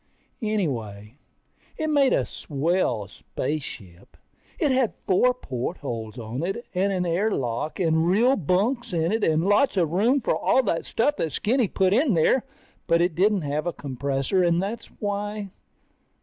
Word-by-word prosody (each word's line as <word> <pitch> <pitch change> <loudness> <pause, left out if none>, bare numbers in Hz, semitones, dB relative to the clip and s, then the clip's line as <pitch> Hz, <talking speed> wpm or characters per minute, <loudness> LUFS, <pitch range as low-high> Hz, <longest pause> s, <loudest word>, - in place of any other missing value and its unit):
Anyway, 125 - -3 0.6
it 315 - -1
made 285 -3 +3
a - - +2
swell 140 - -1
spaceship. 100 - -6 0.4
It 300 -7 +1
had 260 -3 +1
four 220 +7 +4
portholes 125 - -5
on 120 +3 -5
it 195 +8 -3
and 195 +2 +1
an 185 -2 0
air 180 +6 +1
lock 130 - -2
and 160 -2 +2
real 235 +9 +4
bunks 215 - 0
in 165 +1 +1
it 220 0 0
and 160 +2 +2
lots 205 +4 +3
of 165 -4 +2
room 230 +10 +3
for 240 - 0
all 265 - +2
that 170 -7 -1
stuff 290 +6 0
that 160 - -1
Skinny 240 +1 +1
put 190 0 +1
in 250 - +3
there. 200 +10 +3 0.4
But 170 - +3
it 175 0 +1
didn't 195 +2 +2
have 150 +3 -2
a 175 - -1
compressor 135 +5 -1
and 170 -1 +3
that's 205 +5 -3
why 205 -1 -3
180 Hz, 160 wpm, -25 LUFS, 145-215 Hz, 0.6 s, four